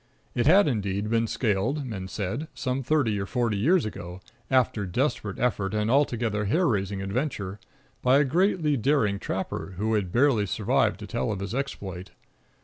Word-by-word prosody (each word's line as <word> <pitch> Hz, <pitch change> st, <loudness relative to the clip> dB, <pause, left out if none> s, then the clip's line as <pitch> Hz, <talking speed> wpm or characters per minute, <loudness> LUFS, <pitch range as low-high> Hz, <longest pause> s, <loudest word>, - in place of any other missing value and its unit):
It 120 Hz, +2 st, +1 dB
had 190 Hz, +4 st, +6 dB
indeed 100 Hz, -4 st, -1 dB
been 115 Hz, 0 st, +2 dB
scaled, 120 Hz, +7 st, 0 dB
men 95 Hz, -6 st, -5 dB
said, 110 Hz, -, -3 dB
some 130 Hz, +1 st, -2 dB
thirty 130 Hz, -6 st, +1 dB
or 100 Hz, -, -3 dB
forty 120 Hz, -3 st, 0 dB
years 160 Hz, -, +3 dB
ago, 90 Hz, -4 st, -7 dB, 0.3 s
after 120 Hz, -6 st, +2 dB
desperate 105 Hz, -1 st, -1 dB
effort 110 Hz, -5 st, 0 dB
and 105 Hz, +1 st, +1 dB
altogether 120 Hz, -6 st, +1 dB
hair 165 Hz, -, +2 dB
raising 100 Hz, -3 st, -1 dB
adventure, 100 Hz, -3 st, -3 dB, 0.4 s
by 130 Hz, +2 st, +5 dB
a 145 Hz, -, +5 dB
greatly 160 Hz, -1 st, +2 dB
daring 115 Hz, -6 st, +1 dB
trapper, 95 Hz, -, -4 dB
who 110 Hz, +3 st, 0 dB
had 100 Hz, -5 st, 0 dB
barely 120 Hz, -3 st, +3 dB
survived -, -, +1 dB
to -, -, -5 dB
tell 65 Hz, -, -2 dB
of 100 Hz, -, -3 dB
his 100 Hz, +2 st, -4 dB
exploit. 100 Hz, -9 st, -4 dB
110 Hz, 165 wpm, -26 LUFS, 100-135 Hz, 0.4 s, had